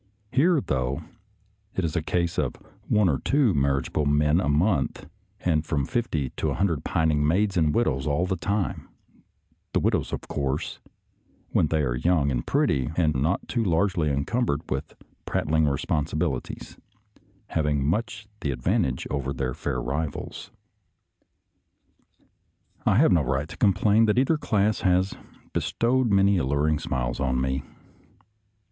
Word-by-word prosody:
Here, 160 +5 +4
though, 65 - -2 0.7
it 95 - 0
is 80 - -3
a 85 - +1
case 85 +2 -1
of - - -1 0.3
one 105 -2 +3
or 70 -6 +1
two 135 -7 +2
mar 70 -2 +2
riageable 75 +1 -2
men 75 +4 +3
a 80 - 0
month, 85 +8 +1 0.3
and 80 -4 +1
from 75 -4 -1
fifty 80 - -1
to - - 0
a - - -1
hun 100 - +2
dred 80 -7 -1
pining 75 -2 +1
maids 100 +5 +2
and 80 -4 +3
widows 75 - 0
all 75 +5 +1
the 95 0 -1
time 100 +2 -2 0.4
— - - -44
the - - +3
widows, - - 0
of - - -3
course, 70 +1 -3 0.7
when - - +3
they 75 0 +1
are 60 -3 0
young 70 +2 +2
and - - -2
pretty 65 0 +1
and 80 -4 +3
not 75 +8 0
too 120 -2 0
largely 90 -3 +1
encumbered 70 - 0
with - - -3 0.3
prat - - -1
tling 80 0 +3
responsibilities, 75 0 -2 0.7
having 75 -3 0
much 105 +5 -2
the 75 - -2
advan 65 -2 +1
tage 65 -1 -3
over 70 -2 -2
their 65 -2 -2
fair - - -3
rivals. 75 +3 -4 2.4
I - - +4
have 135 +2 +5
no 85 -3 +4
right 70 +2 -1
to 80 - -10
complain 105 +5 +3
that 105 +1 +1
either 145 +5 +3
class 105 -5 +1
has 95 +1 +2 0.4
bestowed 125 +1 +1
many 100 -1 +4
alluring 75 +2 +1
smiles - - -2
on 65 -2 0
me. 65 +1 -1
80 Hz, 155 wpm, -25 LUFS, 70-100 Hz, 2.4 s, have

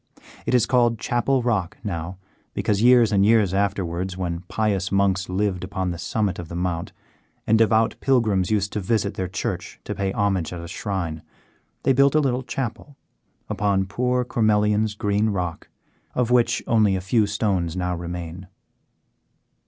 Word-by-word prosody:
It - - +2
is 125 - +4
called 120 -2 +2
Chapel 120 +4 0
Rock 105 -7 -1
now, 90 -2 -4 0.4
because 105 -1 0
years 120 -2 +6
and 100 -1 +3
years 105 -3 +4
afterwards, 95 -2 -1
when 85 -2 -2
pious 100 -3 -1
monks 100 -1 +1
lived 95 -1 -1
upon 95 -1 -2
the 85 - -6
summit 100 -4 -1
of 85 - -6
the 85 - -6
Mount 85 -1 -2 0.5
and 110 - +3
devout 110 0 +3
pilgrims 110 -9 +2
used 105 -2 0
to 105 - -1
visit 105 0 0
their 95 - -3
church 95 - -4
to - - -4
pay 95 -1 -2
homage 95 -5 0
at 90 - -5
a 85 - -7
shrine, 90 -4 -4 0.6
they 135 - +4
built 140 +2 +4
a - - +6
little 130 -3 +1
chapel, 135 +2 -5 0.5
upon 100 -2 0
poor 125 +5 0
Cormelian's 105 -2 +2
green 105 +1 +1
rock, 90 -5 -3 0.5
of 125 -1 0
which 120 -1 +3
only 105 -4 +3
a - - -1
few 105 +3 +1
stones 95 -5 -1
now 90 0 -1
remain. 85 +1 -6
100 Hz, 160 wpm, -23 LUFS, 90-115 Hz, 0.6 s, years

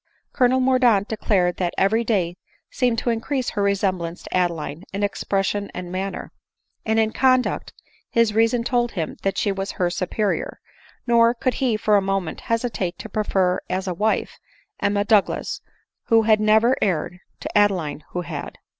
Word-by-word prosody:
Colonel 255 0 +3
Mordaunt 250 -6 +3
declared 190 -5 0
that 175 -2 -2
every 220 +4 +2
day 185 -7 0 0.4
seemed 250 - +1
to 240 - 0
increase 250 +3 -2
her 205 - -2
resembjance 190 -4 -1
to - - -6
Adeline 170 -3 -1
in 200 +2 -3
expression 200 0 -1
and 180 -1 -6
manner; 190 +1 -4 0.5
and 220 0 0
in 220 0 +2
conduct 255 -1 +2 0.4
his 230 -2 +2
reason 230 +2 +2
told 240 -1 0
him 165 -5 -4
that 195 - -1
she 205 - +1
wad 195 0 -3
her 175 -1 -1
superior; 195 +3 -2 0.5
nor 235 0 +4
could 255 +1 0
he 245 -5 +2
for 210 -1 +3
a - - +2
moment 195 -3 -2
hesitate 225 -6 -1
to 220 - -8
prefer 190 -3 +1
as 190 +1 -2
a 180 - -1
wife, 215 +5 -1 0.4
Emma 205 0 +1
Douglas 210 -2 +1 0.4
who 225 -1 +4
had 215 -1 +4
never 220 +4 +4
erred, 180 -1 -1 0.2
to - - -7
Adeline 185 -8 +1
who 180 - -3
had. 165 -4 -7
205 Hz, 165 wpm, -22 LUFS, 185-230 Hz, 0.5 s, nor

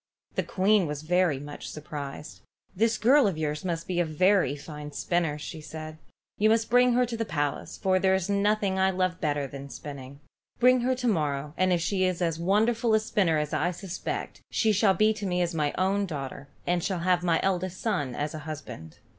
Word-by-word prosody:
The - - 0
Queen 195 -1 +2
was 150 0 -5
very 180 -2 +2
much 145 +1 -8
surprised. 150 -1 -7 0.4
"This 225 +3 +2
girl 265 +1 +5
of 185 -5 -2
yours 150 -1 -2
must 170 -2 -2
be 180 -1 -1
a - - +4
very 180 -1 +2
fine 150 0 -8
spinner," 165 -2 0
she 155 +1 -7
said. 155 0 -8 0.4
"You 215 +1 +4
must 225 0 +2
bring 245 0 +5
her 250 +1 +3
to 240 -1 -5
the 225 - -1
palace, 145 -8 -3
for 185 -1 +2
there 190 0 +3
is 190 -1 -1
nothing 200 -1 +1
I 190 0 +4
love 185 -1 -1
better 145 -2 0
than 140 +1 -8
spinning. 140 +1 -9 0.4
Bring 250 0 +5
her 255 +2 +1
to 250 -1 -2
morrow, 150 -7 0
and 185 0 +2
if 175 -1 +2
she 185 +2 0
is 185 -2 0
as 165 -2 -1
wonderful 220 +5 +2
a - - +4
spinner 200 -7 +1
as 150 -1 -2
I 170 +4 +1
suspect, 180 0 -5
she 220 - +2
shall 200 -1 +3
be 215 +4 +4
to 210 -2 -5
me 180 -1 0
as 170 0 -2
my 150 -3 0
own 195 +2 +1
daughter, 135 -3 -6 0.2
and 175 -1 0
shall 185 -4 -1
have 180 0 +2
my 170 -2 +2
eldest 185 -1 -1
son 145 - -1
as 145 +1 -3
a 155 - -5
husband." 125 - -8
180 Hz, 210 wpm, -27 LUFS, 150-200 Hz, 0.4 s, girl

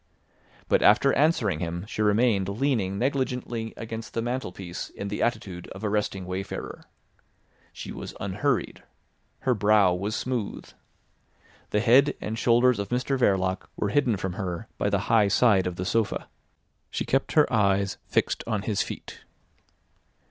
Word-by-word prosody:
But - - +3
after 120 +6 +5
answering 130 - +2
him 85 +2 -4
she 110 - -4
remained 105 -2 +3
leaning 105 -4 0
negligently 125 -3 -2
against 115 0 -7
the 115 - 0
mantelpiece 95 -8 -4
in 100 - -6
the 105 - -3
attitude 105 -7 -2
of 95 - -9
a 105 - 0
resting 100 -3 -1
wayfarer. 95 +2 -5 0.9
She - - -8
was - - -7
unhurried. 110 +7 -1 0.6
Her 130 - +2
brow 105 -3 +4
was 100 +5 -2
smooth. 125 -5 -3 1.0
The 105 - +1
head 130 +5 +5
and 110 - -4
shoulders 120 +1 +3
of 100 -1 -3
Mr 125 +2 0
Verloc 95 -6 +1
were 105 - -1
hidden 120 -3 +2
from 95 -1 -3
her 90 +3 -4
by 100 - +1
the 100 -1 +1
high 105 0 +3
side 100 -3 +4
of 90 - -3
the 90 0 -4
sofa. 110 +2 0 0.6
She - - -3
kept 135 +1 0
her 150 -2 +6
eyes 100 -2 +2
fixed - - 0
on 110 -3 -1
his 105 -3 0
feet. - - -7
105 Hz, 150 wpm, -26 LUFS, 95-120 Hz, 1.0 s, her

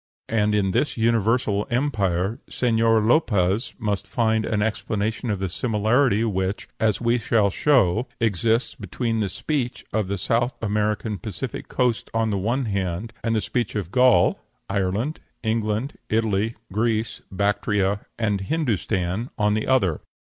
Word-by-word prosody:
And 105 -1 +2
in 95 -2 +2
this 145 +9 0
universal 115 -2 +2
empire 110 -7 0
Señor 115 -2 +2
Lopez 110 - +2
must 100 -3 -2
find 110 +1 +1
an 105 -2 +1
explanation 110 +2 -2
of 105 - 0
the 95 0 -2
similarity 110 +3 +2
which, 95 -2 -1
as 110 -2 +2
we 120 +1 +2
shall 110 -3 +2
show, 125 -4 +3
exists 115 +2 +1
between 115 +2 -2
the 105 -3 0
speech 125 - -3
of 110 -3 0
the 100 +1 -2
South 120 +6 0
American 105 0 -1
Pacific 110 +7 -5
coast 125 -3 0
on 115 -1 +1
the 100 - 0
one 120 +7 0
hand, 100 +1 -2
and 115 -1 +1
the 110 - +1
speech 120 +1 -2
of 95 -5 -3
Gaul, 125 0 +4 0.3
Ireland, 100 +9 -1 0.2
England, 110 +4 -1
Italy, 110 0 +1 0.2
Greece, 110 +1 0
Bactria, 100 0 +1 0.2
and 105 -4 0
Hindostan 110 - -1
on 105 -1 +2
the 110 0 -1
other. 95 - +2
110 Hz, 140 wpm, -24 LUFS, 100-115 Hz, 0.3 s, Gaul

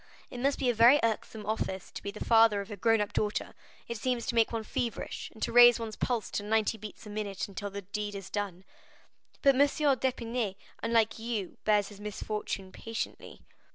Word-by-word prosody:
It 245 - -6
must 275 +3 +1
be 265 - -1
a 245 - +4
very 235 +6 +7
irksome 220 -1 -2
office 195 -3 -3
to - - -7
be 200 - -4
the 210 +1 -6
father 225 -3 +5
of 200 +2 -6
a - - -4
grown 225 +2 +3
up 205 - -3
daughter; 210 -1 -1 0.3
it 235 - -4
seems 245 0 -1
to - - -1
make 230 -1 +3
one 225 -1 -2
feverish, 235 +2 -4
and 220 - -8
to - - 0
raise 240 0 +8
one's 225 -1 -5
pulse 240 -4 -2
to - - -2
ninety 220 +1 +1
beats 215 +1 -9
a - - -9
minute 205 -2 -3
until 200 +1 -5
the 200 0 -7
deed 205 +2 -4
is 195 -1 -8
done." 195 -3 -3 0.8
"But 275 -2 +7
M. 265 - +2
d'Épinay, 255 - +1 0.3
unlike 225 -1 +2
you, 225 -5 -4
bears 210 -2 +3
his 205 -1 -13
misfortune 210 -2 -4
patiently." 225 +3 -6
220 Hz, 200 wpm, -30 LUFS, 205-235 Hz, 0.8 s, raise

